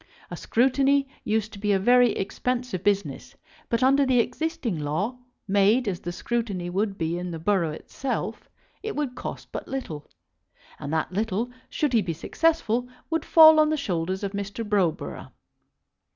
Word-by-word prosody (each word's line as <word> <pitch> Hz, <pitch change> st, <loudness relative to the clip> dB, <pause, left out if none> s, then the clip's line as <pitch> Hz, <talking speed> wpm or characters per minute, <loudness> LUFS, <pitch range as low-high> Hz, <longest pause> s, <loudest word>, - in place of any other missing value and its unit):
A -, -, -4 dB
scrutiny 270 Hz, +3 st, +2 dB, 0.2 s
used 220 Hz, 0 st, -1 dB
to 200 Hz, -, -9 dB
be 205 Hz, 0 st, 0 dB
a -, -, +4 dB
very 245 Hz, +5 st, +4 dB
expensive 245 Hz, 0 st, -3 dB
business, 200 Hz, -9 st, -1 dB, 0.3 s
but 230 Hz, +2 st, +1 dB
under 275 Hz, +2 st, +5 dB
the 260 Hz, -2 st, +3 dB
existing 250 Hz, -, -1 dB
law, 180 Hz, -, -2 dB, 0.3 s
made 205 Hz, +5 st, +3 dB
as 185 Hz, -3 st, -1 dB
the 175 Hz, -, -5 dB
scrutiny 200 Hz, -4 st, -3 dB
would 195 Hz, +1 st, -1 dB
be 165 Hz, +1 st, -1 dB
in 180 Hz, 0 st, -4 dB
the 165 Hz, -, -5 dB
borough 170 Hz, 0 st, +1 dB
itself, 255 Hz, -, -5 dB, 0.3 s
it 435 Hz, +1 st, -4 dB
would 290 Hz, -4 st, -2 dB
cost -, -, -7 dB
but -, -, -6 dB
little; 165 Hz, -, -5 dB, 0.7 s
and 140 Hz, -, -5 dB
that 160 Hz, +2 st, -1 dB
little, 220 Hz, +4 st, -1 dB, 0.2 s
should 295 Hz, -4 st, -1 dB
he 225 Hz, -, +4 dB
be 175 Hz, -4 st, -3 dB
successful, 250 Hz, -, 0 dB, 0.2 s
would 325 Hz, -1 st, 0 dB
fall 315 Hz, -1 st, +8 dB
on 305 Hz, 0 st, +5 dB
the 310 Hz, -, 0 dB
shoulders 185 Hz, -, -2 dB
of 200 Hz, -, -2 dB
Mr. 200 Hz, +2 st, -5 dB
Browborough. 195 Hz, -6 st, -1 dB
215 Hz, 165 wpm, -25 LUFS, 185-255 Hz, 0.7 s, fall